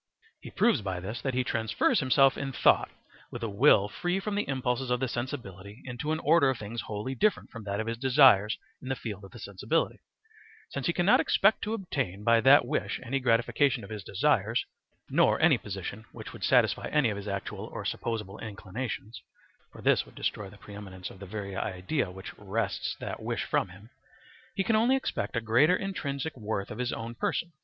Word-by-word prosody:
He - - -10
proves 235 - +2
by 95 -3 -3
this 105 +6 -5
that 130 -2 -2
he 130 - +2
transfers 110 -3 +1
himself 135 0 +4
in 135 -1 -4
thought - - +4 0.4
with - - -7
a - - 0
will 100 0 +5
free 175 - -2
from 210 +1 -3
the 205 -5 -1
impulses 130 -1 -1
of 125 0 +1
the 130 - 0
sensibility 115 -5 -6
into 130 +4 -4
an 155 - +1
order 155 -3 +4
of 130 - 0
things 115 +2 -5
wholly 110 +5 -4
different 210 +9 +1
from 115 -2 -9
that 100 0 -2
of 110 - -1
his 115 0 -4
desires 130 -6 +5 0.2
in 130 - -7
the 130 - 0
field 105 -5 -6
of 95 - -10
the - - -12
sensibility; 105 - -1 0.7
since - - -3
he - - +3
cannot - - +4
expect - - +3
to 220 +1 -1
obtain 135 - -3
by 115 0 +4
that 135 +1 +7
wish 150 +5 -2
any 135 +3 -1
gratification 125 +1 +2
of 100 - -10
his 105 -2 -6
desires, - - +1 0.4
nor - - +3
any - - +5
position 100 +2 -6
which - - -9
would - - -9
satisfy - - +3
any 135 -7 +2
of 100 - -4
his 100 +1 -7
actual 100 -1 -4
or - - -6
supposable 105 -4 -3
inclinations 110 +1 -6 0.5
(for - - -12
this - - +4
would - - -18
destroy 105 -2 -3
the 105 - -15
pre 100 - -12
eminence 95 -3 -8
of 95 - -14
the 100 - -9
very 100 -1 -5
idea 95 +7 -2
which 95 +2 -9
wrests 100 +1 -2
that - - -5
wish - - -2
from - - 0
him): 100 +6 -15 0.6
he 195 - +1
can 220 - +2
only 235 +5 +4
expect 265 - -2
a 115 - +1
greater 120 +11 +4
intrinsic 160 -6 -3
worth 105 -4 -4
of 105 - -7
his 125 -1 -1
own 115 0 -5
person. 170 +7 -2
115 Hz, 205 wpm, -29 LUFS, 100-135 Hz, 0.7 s, that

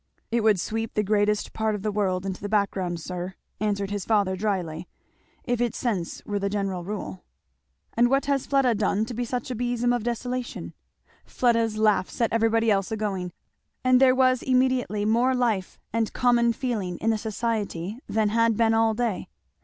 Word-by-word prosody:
"It 235 0 +2
would 215 -3 +4
sweep 225 +4 -3
the 210 - +2
greatest 210 0 +1
part 220 -1 0
of 200 - -6
the 215 - 0
world 190 -3 0
into 190 -1 -4
the 205 - -4
background, 190 -4 0
sir," 180 +2 -5 0.2
answered 200 -1 -1
his 205 -2 -2
father 200 -3 +2
dryly, 180 -5 -2 0.6
"if 245 -1 -1
its 240 -3 0
sense 200 -9 -3
were 205 -1 -2
the 200 0 -1
general 195 -3 -2
rule." 180 - -6 0.7
"And 240 +1 +3
what 275 +1 +2
has 275 -2 0
Fleda 270 -3 +3
done 210 0 +1
to 240 - -6
be 245 +2 -2
such 245 +1 -3
a - - -2
besom 245 +1 0
of 245 - 0
desolation?" 245 +1 -4 0.5
Fleda's 230 -3 +1
laugh 210 -4 +2
set 230 -2 -1
everybody 225 0 +3
else 195 +1 +1
a 220 - -1
going, 190 -4 -2 0.5
and 255 0 +4
there 260 -1 +6
was 255 -1 +3
immediately 255 -5 +1
more 240 +4 +3
life 225 -7 0 0.2
and 225 -1 0
common 240 -1 +3
feeling 215 -9 -3
in 225 - +1
the 220 - +1
society 215 -3 -3
than 215 -1 +1
had 230 0 +2
been 225 -1 +3
all 225 0 +3
day. 230 -4 -2
220 Hz, 185 wpm, -25 LUFS, 200-240 Hz, 0.7 s, there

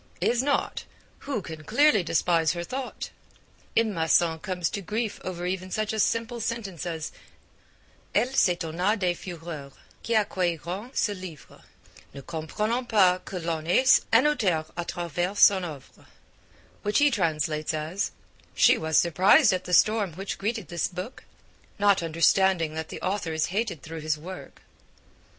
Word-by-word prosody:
is 240 0 +2
not 280 +1 -1 0.4
'who 265 -9 -4
can 160 -2 -8
clearly 235 - +4
despise 165 -1 +1
her 170 -1 -4
thought?' 260 +6 -5 0.7
M. 225 -2 +3
Masson 165 -1 +2
comes 180 -1 -2
to 200 - -4
grief 210 +3 -3
over 175 -1 -5
even 185 +1 -3
such 215 +3 -2
a 220 - -2
simple 230 +2 0
sentence 200 -7 -4
as 160 -2 -4 1.0
'elle 255 +2 +2
s'etonna 180 0 +1
des 180 -3 +1
fureurs 165 -6 -8 0.3
qui 230 - -1
accueillirent 185 0 -1
ce - - +2
livre, 185 -6 -10 0.5
ne 140 - -7
comprenant 210 - -2
pas 185 -4 +4
que - - -8
l'on 165 -2 -3
haisse 255 +9 +5
un 230 +5 +5
auteur 200 - +1
a 175 - -2
travers 175 +3 -3
son 195 -2 +6
oeuvre,' 150 -6 -9 0.7
which 205 0 0
he 290 0 +5
translates 155 - -1 0.4
'she - - +5
was 160 -1 +1
surprised 180 +3 +5
at 185 0 -2
the 180 - -6
storm 205 0 +3
which 195 +4 -5
greeted 220 +3 -3
this 170 -2 -1
book, 185 +8 -8 0.5
not 200 -2 +3
understanding 165 0 +2
that 160 0 -5
the - - -7
author 185 -4 -2
is 160 0 +1
hated 210 - -2
through 160 0 -7
his 155 0 -1
work.' 180 +5 -10
180 Hz, 150 wpm, -26 LUFS, 165-210 Hz, 1.0 s, son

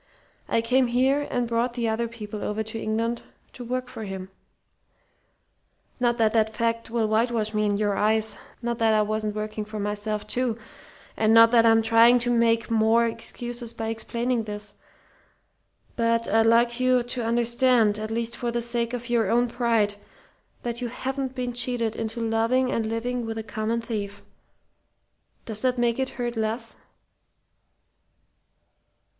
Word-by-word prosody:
I 230 - +2
came 250 +2 +2
here 265 +4 +1
and 245 -1 -1
brought 235 +1 -1
the 235 -2 -1
other 225 +1 -1
people 215 -2 -7
over 215 +1 -2
to 220 +1 -7
England 230 +2 -1 0.3
to 250 - -8
work 250 +1 -3
for 235 -3 -8
him. 190 -2 -7 1.7
"Not 240 -1 +1
that 220 -2 +2
that 220 -1 +1
fact 230 +1 -1
will 230 -1 0
whitewash 220 0 +1
me 210 0 +1
in 205 -1 +1
your 205 -1 0
eyes; 215 +1 +1 0.3
not 235 0 -2
that 225 -1 +3
I 215 - +3
wasn't 215 0 -2
working 215 0 -4
for 215 0 -7
myself, 210 +1 -3
too, 245 -3 -1 0.6
and 220 0 +3
not 230 0 +8
that 230 -1 +5
I'm 225 0 +5
trying 230 +2 +6
to 245 0 +1
make 230 -1 +2
more 225 +1 +4
excuses 235 +1 -3
by 225 0 -3
explaining 235 +1 -2
this. 210 -1 -6 1.2
But 230 0 +1
I'd 225 0 +3
like 235 +1 +3
you 255 -1 +3
to 245 0 -3
understand, 235 -1 +2
at 215 0 -4
least 230 +1 -2
for 240 - -3
the 235 0 -1
sake 235 0 -2
of 240 -1 -4
your 230 -4 +1
own 240 +1 +3
pride, 230 -4 +1 0.7
that 235 0 -4
you 245 - -1
haven't 265 +2 -4
been 250 -2 -3
cheated 240 -2 0
into 225 +1 -4
loving 235 +3 +1
and 225 -5 -1
living 240 +2 -2
with 225 0 -4
a 220 - -4
common 220 +2 -2
thief. 205 -3 -5 1.2
Does 215 -2 -3
that 255 -1 +1
make 240 0 +1
it 265 0 0
hurt 240 -1 -2
less?" 225 +1 -2
230 Hz, 160 wpm, -25 LUFS, 220-240 Hz, 1.7 s, not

